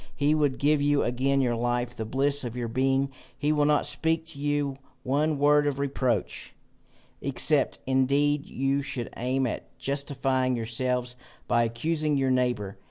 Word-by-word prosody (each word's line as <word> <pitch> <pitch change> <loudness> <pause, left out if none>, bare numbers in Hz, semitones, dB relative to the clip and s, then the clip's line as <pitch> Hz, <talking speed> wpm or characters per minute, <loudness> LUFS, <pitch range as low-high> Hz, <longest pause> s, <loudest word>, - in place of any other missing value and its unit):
He 145 +1 +2
would 145 -4 +1
give 145 +1 +2
you 145 0 +2
again 135 +3 +1
your 120 -2 +1
life, 120 +1 -1
the 110 - -4
bliss 140 +4 +1
of 120 0 -5
your 120 -1 -2
being. 135 +3 +1 0.3
He 150 +2 0
will 150 -1 +2
not 150 0 +3
speak 160 +3 0
to 150 -3 -7
you 145 -2 -1 0.3
one 145 +3 +1
word 145 +1 +4
of 140 -2 -1
reproach, 130 -6 -2 0.7
except - - +2
indeed 140 +2 +1
you 135 +2 0
should 125 -4 -4
aim 130 +2 0
at 120 - -5
justifying 135 -2 0
yourselves 125 +2 -2 0.3
by 120 -1 +3
accusing 150 +6 -1
your 135 -1 +1
neighbour. 120 -6 0
135 Hz, 160 wpm, -27 LUFS, 125-145 Hz, 0.7 s, word